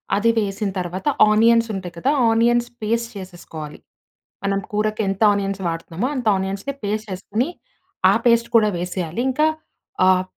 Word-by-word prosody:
అది 210 +3 +2
వేసిన 205 -1 -1
తర్వాత, 180 - -4 0.2
ఆనియన్స్ 230 +1 +4
ఉంటయి 185 -3 -5
కదా! 260 +11 +1 0.2
ఆనియన్స్ 235 +1 +3
పేస్ట్ 230 +2 -1
చేసేసుకోవాలి. 170 -5 -9 0.6
మనం 195 0 0
కూరకి 215 +1 0
ఎంత 195 +2 -2
ఆనియన్స్ 195 -1 -2
వాడుతున్నామో 165 +6 -3
అంత 250 - -3
ఆనియన్స్‌ని 195 +8 -3
పేస్ట్ 215 +2 -2
చేసుకొని, 205 +7 -2 0.6
ఆ - - +4
పేస్ట్ 235 0 +4
కూడా 215 -2 +4
వేసేయాలి. 180 +2 -3
ఇంకా 305 +4 +2 0.6
ఆహ్, 185 0 +4
205 Hz, 140 wpm, -21 LUFS, 185-230 Hz, 0.6 s, ఆనియన్స్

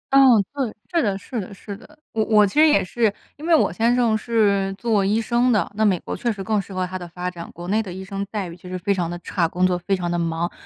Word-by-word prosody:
嗯， 250 -7 +7
对， 265 -6 -2 0.2
是 335 - +3
的， 200 -5 0
是 225 +3 -5
的， 185 - -9
是 200 +1 -8
的。 305 +8 -17
我 220 -1 0
我 210 -2 +5
其 195 - -4
实 315 - +7
也 300 - +4
是 220 +3 +1 0.2
因 310 +3 -8
为 335 - +6
我 - - +2
先 235 +2 +2
生 235 -3 +2
是 205 -4 +1
做 210 -2 +1
医 210 +3 +2
生 240 +2 +2
的， 210 -2 +1
那 215 +1 0
美 190 -5 +3
国 - - -5
确 235 - -1
实 195 -2 -5
更 215 -1 +1
适 195 - -14
合 185 -1 -1
他 185 +1 -5
的 175 - -7
发 180 +1 -5
展， 170 -1 -9
国 175 +1 -9
内 215 +2 +2
的 190 -4 -7
医 190 +1 -7
生 195 0 -4
待 205 -4 -3
遇 170 - -9
确 180 +1 -12
实 185 - -3
非 200 +3 0
常 175 -3 -1
地 175 - -4
差， 170 -4 0
工 180 +2 0
作 180 -1 +2
非 195 +2 0
常 175 -2 -3
地 175 - 0
忙， 165 +1 -1
200 Hz, 310 characters per minute, -22 LUFS, 180-225 Hz, 0.2 s, 嗯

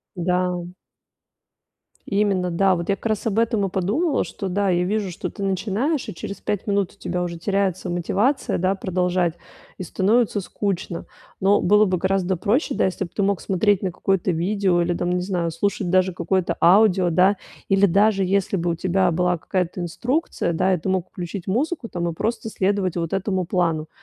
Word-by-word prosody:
Да. 180 0 -1 1.3
Именно, 195 -3 +1
да. 190 +2 +3
Вот 170 -1 -4
я 200 - +2
как 215 - -9
раз 215 0 -1
об 215 - -1
этом 225 -3 +2
и 195 - 0
подумала, 220 - 0
что 195 -3 -5
да, 200 +1 +1
я 175 0 +2
вижу, 200 +1 -1
что - - -5
ты 200 - -6
начинаешь, 210 - -1
и - - -5
через 195 +3 -7
5 205 0 -3
минут 200 -2 0
у 200 - -30
тебя 180 0 -2
уже 170 -1 -4
теряется 190 0 -1
мотивация, 200 - 0
да, 185 +2 +1
продолжать, 180 -2 0 0.4
и 185 - -4
становится 205 +4 +1
скучно. 190 -2 -3 0.3
Но 200 +2 +4
было 210 +3 +5
бы 185 -3 0
гораздо 190 -1 0
проще, 240 - 0
да, - - +2
если 190 +1 -2
бы 170 - -9
ты 205 - 0
мог 200 -1 +1
смотреть 200 +1 +1
на 185 -3 -1
какое-то 190 0 0
видео 180 +1 +1
или 175 +1 0
там, 175 +1 -2
не 180 0 0
знаю, 175 -3 -1
слушать 180 +1 -1
даже 185 0 +3
какое-то 180 +1 -1
аудио, 185 -1 +5
да, 185 +4 +4 0.3
или 195 0 +4
даже 195 +1 +3
если 195 +1 +1
бы 175 0 -1
у 165 - +1
тебя 185 +1 +1
была 180 +1 +1
какая-то 180 +1 -2
инструкция, 245 - -1
да, 185 +3 +2
и 170 - -3
ты - - -4
мог 185 -2 0
включить 180 0 -6
музыку 260 - -1
там 175 -3 -2
и 170 - -2
просто 225 +5 -2
следовать 195 -3 0
вот 165 -2 -2
этому 190 -1 0
плану, 165 -3 0
190 Hz, 190 wpm, -22 LUFS, 175-200 Hz, 1.3 s, было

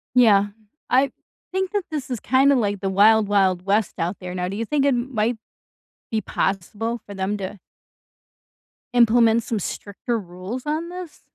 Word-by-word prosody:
Yeah. 205 -5 +6 0.4
I 270 +2 +3 0.4
think 380 0 -1
that 410 -2 0
this 290 -3 -4
is 245 -3 -3
kinda 270 +5 +4
like 205 -5 0
the 195 - -1
wild 210 +2 +5
wild 190 -3 +2
west 205 +1 +1
out 175 +4 -1
there, 180 -1 -6
now 180 0 -2
do 195 - -4
you 230 - -2
think 280 +3 +1
it - - +5
m 255 0 -1
might 220 +1 +1 0.7
be 220 - 0
possible 210 +5 -2
for 200 - -9
them 195 +2 -1
to 195 +1 -6 1.4
implement 230 -1 +5
some 220 -1 -2
stricter 205 +5 -4
rules 185 +6 -7
on 310 +3 -2
this? 360 -2 -8
220 Hz, 170 wpm, -23 LUFS, 200-255 Hz, 1.4 s, Yeah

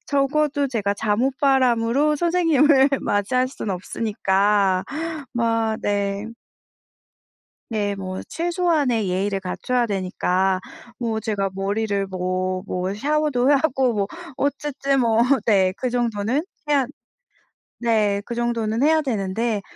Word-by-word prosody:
적어도 285 0 +1
제가 210 -6 -1
잠옷 225 +6 0
바람으로 265 +2 +3
선생님을 300 -5 +4
맞이할 250 +6 +1
순 240 -5 -5
없으니까. 195 -1 +1 0.5
마 225 -2 +1
네. 200 0 -1 1.4
네 205 -3 -1
뭐 185 -1 -5
최소한의 325 - 0
예의를 195 +2 -1
갖춰야 240 +6 -1
되니까 185 -1 0 0.4
뭐 225 -2 -1
제가 200 -2 -1
머리를 200 0 -1
뭐 185 0 -2 0.2
뭐 185 +2 -2
샤워도 285 +1 +1
하고 270 -3 +2
뭐 200 -2 0 0.3
어쨌든 280 -1 0
뭐 230 -2 +2 0.3
네 190 -3 +4
그 255 - -2
정도는 240 +3 0 0.3
해야 280 -4 +3 0.9
네 215 -4 +1
그 235 - -5
정도는 235 0 -1
해야 315 +1 +4
되는데 220 -3 -1
225 Hz, 230 characters per minute, -22 LUFS, 200-270 Hz, 1.4 s, 선생님을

